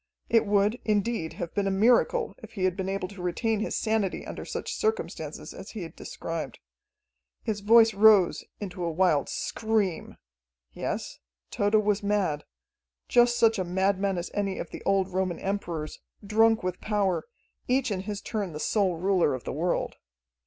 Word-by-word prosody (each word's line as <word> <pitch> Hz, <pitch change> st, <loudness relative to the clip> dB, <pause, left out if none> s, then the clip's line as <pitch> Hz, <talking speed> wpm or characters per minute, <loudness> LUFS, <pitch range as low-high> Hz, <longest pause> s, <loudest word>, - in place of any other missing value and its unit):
It 230 Hz, -2 st, +3 dB
would, 205 Hz, +3 st, +2 dB
indeed, 210 Hz, -5 st, 0 dB
have 170 Hz, -, -6 dB
been 200 Hz, -1 st, 0 dB
a -, -, +2 dB
miracle 245 Hz, -, +3 dB
if -, -, -12 dB
he 190 Hz, -, -3 dB
had 185 Hz, -1 st, +2 dB
been 190 Hz, 0 st, -3 dB
able 195 Hz, -1 st, -2 dB
to 200 Hz, -2 st, -10 dB
retain 215 Hz, +5 st, 0 dB
his 215 Hz, -, -2 dB
sanity 220 Hz, -4 st, 0 dB
under -, -, -7 dB
such -, -, -4 dB
circumstances 440 Hz, 0 st, -3 dB
as -, -, -9 dB
he 215 Hz, -5 st, -6 dB
had 165 Hz, -, -9 dB
described. 165 Hz, -1 st, -5 dB, 0.9 s
His 215 Hz, -2 st, -2 dB
voice 225 Hz, +2 st, +6 dB
rose 205 Hz, -3 st, +5 dB, 0.2 s
into 185 Hz, -3 st, -5 dB
a 170 Hz, -, 0 dB
wild 165 Hz, -3 st, +2 dB
scream. 215 Hz, -6 st, -1 dB, 0.6 s
Yes, -, -, -4 dB, 0.3 s
Tode 205 Hz, +1 st, +1 dB
was 210 Hz, -1 st, +2 dB
mad 200 Hz, -8 st, 0 dB, 0.6 s
just 240 Hz, 0 st, +4 dB
such 225 Hz, -2 st, +4 dB
a -, -, +1 dB
madman 190 Hz, +2 st, 0 dB
as 175 Hz, -, -4 dB
any 200 Hz, -2 st, -1 dB
of 170 Hz, -, -6 dB
the -, -, -7 dB
old 195 Hz, -1 st, +3 dB
Roman 185 Hz, -2 st, -1 dB
emperors, 175 Hz, -6 st, -4 dB, 0.3 s
drunk 225 Hz, +1 st, +3 dB
with 185 Hz, 0 st, -3 dB
power, 205 Hz, -4 st, 0 dB, 0.4 s
each 255 Hz, -1 st, +1 dB
in 195 Hz, -, -1 dB
his 205 Hz, +1 st, -5 dB
turn 205 Hz, -6 st, -3 dB
the 150 Hz, -, -6 dB
sole 195 Hz, 0 st, +1 dB
ruler 180 Hz, -5 st, +2 dB
of 130 Hz, -, -8 dB
the -, -, -4 dB
world. 170 Hz, +5 st, -1 dB
200 Hz, 170 wpm, -27 LUFS, 185-220 Hz, 0.9 s, voice